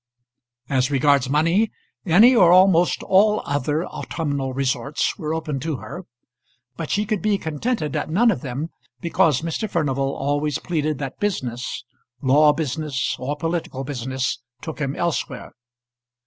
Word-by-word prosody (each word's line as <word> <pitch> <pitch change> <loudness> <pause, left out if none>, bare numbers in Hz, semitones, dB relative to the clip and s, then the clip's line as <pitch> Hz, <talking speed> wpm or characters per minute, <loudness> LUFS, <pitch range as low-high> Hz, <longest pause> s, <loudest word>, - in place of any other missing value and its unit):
As 130 -1 +1
regards 140 -2 +3
money, 165 +9 +2 0.4
any 220 +10 +7
or 180 -7 +6
almost 180 -1 +5
all 210 +3 +3
other 145 +4 -1
autumnal 140 -5 -3
resorts 135 +2 -1
were 155 -3 -3
open 155 -3 -2
to 155 +3 -2
her, 175 +8 -8 0.7
but 160 +2 -5
she 210 +1 +1
could 210 -2 -1
be 210 -2 +2
contented 160 - -2
at - - -2
none 225 +9 +4
of 190 - -3
them 140 +3 -4 0.3
because 155 -2 +2
Mr. 170 +6 -2
Furnival 135 -5 0
always 145 +1 -1
pleaded 155 -4 -2
that 135 -1 -6
business 130 - -3 0.4
law 145 +4 +5
business 150 -3 -2
or 140 +3 -2
political 165 -4 -3
business 130 -2 -3 0.2
took 160 -1 -7
him 135 0 -1
elsewhere. 170 -2 -3
150 Hz, 140 wpm, -22 LUFS, 135-175 Hz, 0.7 s, any